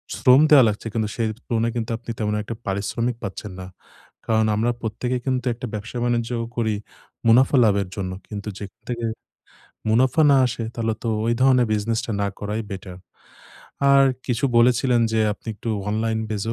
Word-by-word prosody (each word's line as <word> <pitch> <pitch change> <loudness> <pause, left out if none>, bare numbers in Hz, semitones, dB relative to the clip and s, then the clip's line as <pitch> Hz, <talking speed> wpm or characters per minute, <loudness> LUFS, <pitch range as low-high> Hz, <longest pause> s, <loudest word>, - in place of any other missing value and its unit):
শ্রম 130 +2 +6
দেয়া 140 -4 +9
লাগছে, 105 +2 -4
কিন্তু 110 -2 -1
সেই 115 -2 0 0.2
তুলনায় 115 -1 0
কিন্তু 115 0 -3
আপনি, 120 0 -7
তেমন 105 -1 0
একটা 115 +2 -6
পারিশ্রমিক 105 +5 -1
পাচ্ছেন 100 +1 -6
না। 90 - -7 0.6
কারণ, 110 -1 +2
আমরা 115 +3 +1
প্রত্যেকে 120 +3 -2
কিন্তু 130 -1 -1
একটা 125 +2 -7
ব্যবসা 110 +4 -5
বাণিজ্যও 120 -1 0
করি, 110 -2 +1 0.5
মুনাফা 130 +4 +5
লাভের 100 -2 +2
জন্য। 95 -2 -3 0.2
কিন্তু 105 0 -7
যেখান 105 +2 -10
থেকে 120 -1 -2 0.8
মুনাফা 130 +7 +3
না 135 - +6
আসে, 120 -1 -4
তাহলে 115 -1 -1
তো, 115 - 0 0.2
ওই 115 - +2
ধরণের 130 -3 +4
বিজনেসটা 110 +2 -1
না 100 - +1
করাই 105 +2 -3
বেটার। 95 -2 -7 0.9
আর 140 0 +7 0.2
কিছু 120 +1 0
বলেছিলেন 120 0 +4
যে, 110 - +2
আপনি 105 - -20
একটু 115 - -5 0.2
অনলাইন 110 +1 0
বেজ 105 -2 -2
115 Hz, 165 wpm, -23 LUFS, 105-120 Hz, 0.9 s, দেয়া